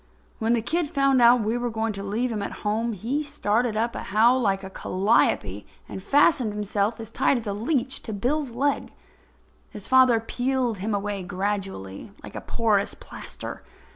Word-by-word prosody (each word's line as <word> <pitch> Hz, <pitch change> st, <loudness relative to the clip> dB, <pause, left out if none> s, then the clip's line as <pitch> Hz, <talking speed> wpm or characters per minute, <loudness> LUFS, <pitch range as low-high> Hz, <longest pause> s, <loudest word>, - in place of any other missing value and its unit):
When 225 Hz, +1 st, +2 dB
the 230 Hz, -2 st, +1 dB
kid 325 Hz, +4 st, 0 dB
found 275 Hz, -3 st, +3 dB
out 240 Hz, +1 st, +6 dB
we 225 Hz, +3 st, -1 dB
were 240 Hz, 0 st, -1 dB
going 225 Hz, -1 st, -2 dB
to 195 Hz, -, -6 dB
leave 220 Hz, +5 st, -1 dB
him 215 Hz, -2 st, -3 dB
at 200 Hz, -, -4 dB
home 225 Hz, +3 st, 0 dB
he 235 Hz, +9 st, -2 dB
started 240 Hz, -6 st, -1 dB
up 230 Hz, +2 st, 0 dB
a -, -, -4 dB
howl 230 Hz, +5 st, +3 dB
like 195 Hz, -3 st, 0 dB
a 190 Hz, -, -6 dB
calliope 185 Hz, -, +1 dB, 0.2 s
and 190 Hz, -, -7 dB
fastened 265 Hz, -, +3 dB
himself 210 Hz, +2 st, -1 dB
as 225 Hz, 0 st, -8 dB
tight 265 Hz, +2 st, +2 dB
as 235 Hz, -, -6 dB
a 205 Hz, -, -2 dB
leech 260 Hz, +4 st, -1 dB
to 220 Hz, -, -7 dB
Bill's 255 Hz, +8 st, -1 dB
leg. 275 Hz, +4 st, -1 dB, 0.8 s
His 210 Hz, -2 st, -8 dB
father 255 Hz, -3 st, +5 dB
peeled 245 Hz, -1 st, -1 dB
him 205 Hz, +2 st, -1 dB
away 200 Hz, -1 st, -3 dB
gradually, 190 Hz, -, -4 dB
like -, -, -10 dB
a -, -, -5 dB
porous 215 Hz, -4 st, 0 dB
plaster. -, -, -9 dB
225 Hz, 180 wpm, -25 LUFS, 205-250 Hz, 0.8 s, out